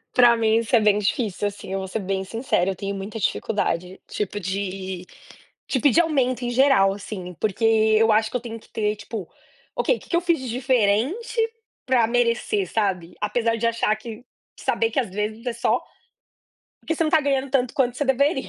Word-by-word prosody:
Pra 240 -1 +6
mim 225 0 +3
isso 230 +2 +2
é - - +5
bem 210 -1 +4
difícil, 205 -1 -1
assim, 200 -1 -9
eu 195 - -1
vou 190 - -5
ser 220 - -3
bem 190 0 -2
sincera, 210 -3 -1
eu 190 - -4
tenho 200 +1 -4
muita 200 +3 -6
dificuldade, 185 -3 -1
tipo 205 0 -3
de 190 -1 -4 0.6
de 260 - 0
pedir 290 +6 +5
aumento 260 -6 0
em 240 - -1
geral 245 -6 +4
assim. 190 -3 -7
Porque 215 +1 -1
eu 220 0 +4
acho 220 +1 +2
que - - -2
eu 250 - -1
tenho 230 -2 -7
que - - -21
ter 210 -1 0
tipo: 210 -3 -7 0.5
"Ok, - - +1
que - - -17
que 340 - +2
eu - - +3
fiz 340 -1 +1
de 260 - -5
diferente 255 - +1 0.5
pra 245 -3 +3
merecer", 235 -5 0
sabe? 185 -5 -1
Apesar 230 +2 +1
de 230 - 0
achar 230 -2 +1
que 225 +1 -9 0.4
saber 455 - 0
que, 275 - +1
às 240 - -4
vezes 215 +4 -4
é 245 - 0
só 235 - +1 1.0
porque 325 - -2
você 330 - +1
não - - +1
está 315 0 +4
ganhando 275 -1 0
tanto 255 -3 +1
quanto 250 -2 +1
você 290 - 0
deveria, 270 +1 +1
225 Hz, 200 wpm, -23 LUFS, 200-255 Hz, 1.0 s, Pra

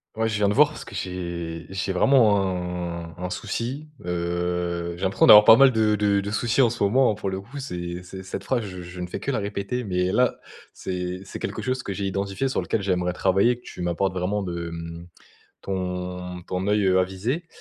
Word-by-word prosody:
Ouais, 110 0 0
je 105 - -2
viens 105 -1 +2
te 100 - +2
voir 150 +4 +6
parce 150 - -9
que - - -10
j'ai 85 -3 -4
j'ai 95 0 -2
vraiment 105 +1 +4
un 90 -3 -3
un 90 - -3
souci. 120 +9 -4 0.2
Heu, 85 0 -2
j'ai 90 - -8
l'impression 95 0 +3
d'avoir 105 0 +11
pas 110 - +9
mal 135 0 +7
de 110 -1 +3
de 100 -1 +2
de 100 +1 -4
soucis 115 +4 +1
en 120 - +5
ce 120 - -6
moment, 120 +1 +3
pour 100 -1 -3
le 95 0 -4
coup, 125 +8 -9
c'est 90 -9 -5
c'est 95 +1 -9
cette 95 +1 -6
phrase, 125 -3 0
je 90 -3 -7
je 90 +1 -8
ne 90 - -3
fais - - -5
que - - -4
la 125 - 0
répéter, 100 +4 -3
mais 90 -2 0
là, 125 -1 +2 0.3
c'est 90 0 -4
c'est - - -8
quelque 100 +3 -4
chose 130 +3 -2
que - - -4
j'ai 100 +1 -3
identifié, 100 +5 -1
sur 130 - -1
lequel 115 - -1
j'aimerais 90 -2 0
travailler, 95 +6 +2
que 125 - -21
tu - - -9
m'apportes 90 +2 0
vraiment 95 +3 -1
de, 85 -3 -4
mmh 85 +1 -7 0.6
ton 90 -1 -4
ton 90 +2 -3
oeil, 105 -1 +2
heu, 95 0 +4
avisé. 105 - -2
95 Hz, 220 wpm, -24 LUFS, 90-110 Hz, 0.6 s, d'avoir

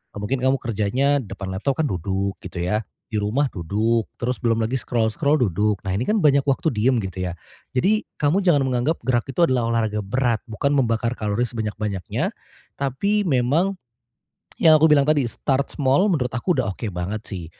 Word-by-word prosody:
mungkin 105 +6 -2
kamu 130 +1 +1
kerjanya 120 +6 +1
depan 100 -5 -6
laptop 135 +11 -1
kan 150 - +1
duduk 95 +2 -2
gitu 85 - -8
ya, 105 +5 -1 0.3
di 105 - 0
rumah 115 +8 +1
duduk 110 +6 0
terus 125 +1 -3
belum 115 -2 +2
lagi 115 - -4
scroll-scroll 125 +4 +1
duduk 105 - +1
nah 95 - -1
ini 100 - -1
kan 210 - +1
banyak 145 -7 +4
waktu 140 +3 +1
diam 120 +4 +2
gitu 95 -2 -4
ya, - - -6 0.4
jadi 210 +12 +2 0.2
kamu 150 +7 +2
jangan 150 -7 +4
menganggap 130 +6 0
gerak 120 -2 +2
itu 170 +6 +3
adalah 120 -3 +1
olahraga 110 -2 0
berat 120 +2 0
bukan 140 +6 0
membakar 115 -3 +1
kalori 105 +2 -1
sebanyak-banyaknya, 105 - -3 0.5
tapi 200 +11 0
memang. 150 +8 +2 0.8
Yang 160 -2 +7
aku 155 +1 +5
bilang 140 -1 +5
tadi 150 -2 +3
start 135 +3 -1
small 145 +9 +2
menurut 125 -7 -1
aku 125 +9 0
udah 125 - 0
oke 95 +4 -6
banget 95 +5 -4
sih, 90 -5 -6
120 Hz, 175 wpm, -22 LUFS, 105-140 Hz, 0.8 s, Yang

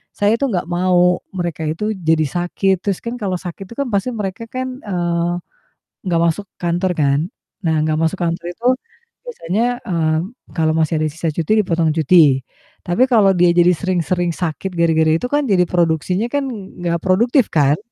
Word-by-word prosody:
saya 210 +3 +2
itu 275 - +1
nggak 190 -8 -1
mau 180 0 +3 0.2
mereka 170 -3 -3
itu 190 +8 -2
jadi 160 -6 +1
sakit 175 +4 0
terus 195 0 -3
kan 235 +1 -5
kalau 195 -4 -1
sakit 180 +2 -7
itu 235 - -11
kan 280 -2 -3
pasti 210 +5 -1
mereka 210 +1 -4
kan, 255 +1 -5
eee, 175 -4 -2 0.7
gak 170 - +2
masuk 185 +4 -1
kantor 175 +2 0
kan. 140 -2 +2 0.4
Nah 160 -4 +1
gak 155 - 0
masuk 165 +4 0
kantor 170 -1 -2
itu 200 +7 -9 0.6
biasanya, 245 - -2
eee, 160 -3 +1 0.4
kalau 160 -1 +2
masih 160 0 +1
ada 155 - 0
sisa 165 0 -2
cuti 160 +4 -3
dipotong 165 -4 0
cuti. 155 -4 +4 0.4
Tapi 180 +9 +2
kalau 205 -7 +4
dia 175 0 +4
jadi 175 0 +5
sering-sering 175 -2 -1
sakit 175 +3 -4
gara-gara 160 -2 +2
itu 165 +10 0
kan 290 +1 +1
jadi 195 -7 +3
produksinya 175 +4 +1
kan 285 -2 0
ng 200 -7 -9
nggak 170 -1 0
produktif 235 +7 +3
kan? 145 -1 +3
175 Hz, 175 wpm, -18 LUFS, 165-205 Hz, 0.7 s, jadi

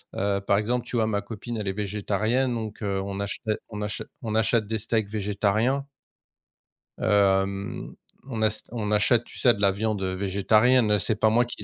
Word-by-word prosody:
heu, 100 0 0
par 100 0 +2
exemple, 120 +3 0
tu - - -6
vois, 110 -1 +2
ma 100 -2 0
copine 115 +2 -6
elle 105 -2 -4
est 95 - 0
végétarienne 105 +5 0
donc, 110 -1 -5
heu, 100 -2 -1
on 100 0 -5
achè 100 0 -3 0.3
on 105 -2 -6
achè 105 -1 -3 0.2
on 110 -1 -3
achète 110 -1 +2
des 110 - -1
steaks 110 -1 -1
végétariens. 110 +6 0 1.1
Hem, 100 -1 +1 0.4
on 115 -4 -3
as 110 0 +1
on 110 -3 -3
achète, 115 +3 +3
tu - - -12
sais, 120 -2 +5
de - - -8
la 100 -1 +5
viande, 105 +1 -1
heu, 95 -1 -1
végétarienne, 105 +5 +3
heu, 105 - +3
c'est 110 - 0
pas 110 +2 +3
moi 115 +3 +4
qui 120 -3 -7
105 Hz, 195 wpm, -26 LUFS, 100-115 Hz, 1.1 s, sais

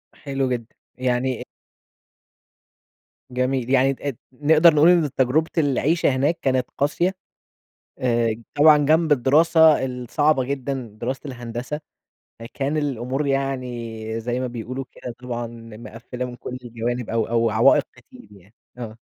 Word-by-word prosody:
حلو 135 -2 -2
جدًا. 120 -2 -3 0.3
يعني 125 0 -1 1.9
جميل. 125 0 -1
يعني 135 +1 +3
تقد 135 -2 -5 0.2
نقدر 155 +4 +5
نقول 155 +3 +6
إن 170 -5 +4
تجربة 140 +6 +2
العيشة 150 +2 +2
هناك 145 +6 +1
كانت 130 -2 +1
قاسية. 175 +6 +1 0.8
آآ، 115 -3 +1 0.2
طبعًا 150 0 +7
جنب 155 +2 +3
الدراسة 155 +2 +5
الصعبة 130 +3 0
جدًا، 135 -2 -3
دراسة 130 +2 -3
الهندسة 120 +3 -5 0.6
فكان 135 +6 -3
الأمور 135 -1 -2
يعني 120 -5 -3
زي 120 +2 -2
ما 130 - -1
بيقولوا 125 +2 -5
كده 125 - -8
طبعًا 120 -1 -4 0.3
مقفِّلة 120 +2 -7
من 125 -1 -7
كل 125 0 -7
الجوانب 120 +1 -3
أو 115 -1 0
أو 115 0 +2
عوائق 110 +1 +4
كتير - - -17
يعني 100 +2 -19 0.2
آه. 115 -3 -7
130 Hz, 125 wpm, -22 LUFS, 120-145 Hz, 1.9 s, طبعًا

